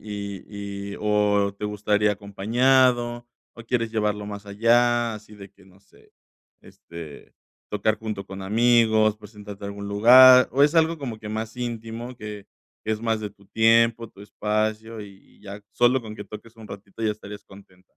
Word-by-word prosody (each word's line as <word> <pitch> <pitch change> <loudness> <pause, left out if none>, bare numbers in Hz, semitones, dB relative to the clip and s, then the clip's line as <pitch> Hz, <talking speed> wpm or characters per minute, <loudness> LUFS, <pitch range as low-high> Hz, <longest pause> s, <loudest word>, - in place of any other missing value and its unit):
y 100 -1 -7
y - - -9
o 105 -1 +1
¿te 105 - -6
gustaría 105 0 0
acompañado 120 +4 +1 0.3
o 115 - -11
quieres 115 -1 -2
llevarlo 105 -2 -1
más 105 0 -8
allá? 120 +2 +2
Así 105 0 -13
de 100 -1 -11
que 95 0 -23
no 95 0 -21
sé, 100 - -25 0.5
este, 80 -4 -12 0.4
tocar 110 +1 0
junto 105 -3 -5
con 95 0 -8
amigos, 110 0 +3
presentarte 105 -1 -12
a - - -4
algún 100 0 -7
lugar 125 +5 +7
o 140 +3 +4
¿es 150 +3 +1
algo 165 0 +2
como 120 -6 -6
que 110 - -8
más 110 +2 -5
íntimo 120 0 -6
que 105 -3 -9 0.3
que - - -4
es 110 - -4
más 115 -1 0
de 105 - -4
tu 100 0 -24
tiempo, 115 +2 +3
tu 100 - -18
espacio 110 +2 -3
y 100 -2 -14
y - - -26
ya 100 0 -10
solo 120 +1 +2
con 110 -1 -9
que 105 - -8
toques 110 +3 -12
un 110 - -12
ratito 100 +1 -12
ya 110 -1 +1
estarías 105 -1 -11
contenta? 95 -2 -18
105 Hz, 175 wpm, -24 LUFS, 100-115 Hz, 0.5 s, lugar